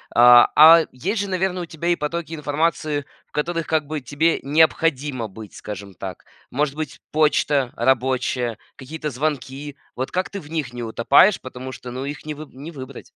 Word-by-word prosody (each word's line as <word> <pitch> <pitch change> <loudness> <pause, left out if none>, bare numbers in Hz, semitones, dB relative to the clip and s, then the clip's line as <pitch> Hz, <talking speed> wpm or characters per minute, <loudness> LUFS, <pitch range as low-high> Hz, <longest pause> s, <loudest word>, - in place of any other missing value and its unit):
А, 120 0 +8
а 160 +2 +9
есть 190 - -2
же, 200 - -4
наверное, 185 -1 -1
у - - -5
тебя 165 +2 -3
и 175 - +4
потоки 165 +1 -4
информации, 150 -1 -1 0.2
в - - -43
которых 165 +2 -2
как 155 -2 +1
бы 150 0 -4
тебе 150 +5 +1
необходимо 145 -4 +1
быть, 105 0 -11
скажем 100 -2 -8
так. 95 0 -8 0.2
Может 145 +1 -1
быть, 155 -3 -6
почта 145 -4 +2
рабочая, 125 -2 0 0.2
какие-то 150 +3 -6
звонки. 140 +1 -3 0.2
Вот 130 +1 -3
как 185 +1 -2
ты 200 - -5
в 150 - -13
них 155 -6 -3
не 120 - -6
утопаешь, 120 - +4
потому 130 0 -8
что, 125 0 -9
ну 130 +2 -5
их 145 +2 -7
не 155 - -4
вы 150 +1 -9
не 145 +6 -9
выбрать? 135 -3 -9
145 Hz, 180 wpm, -22 LUFS, 130-160 Hz, 0.2 s, а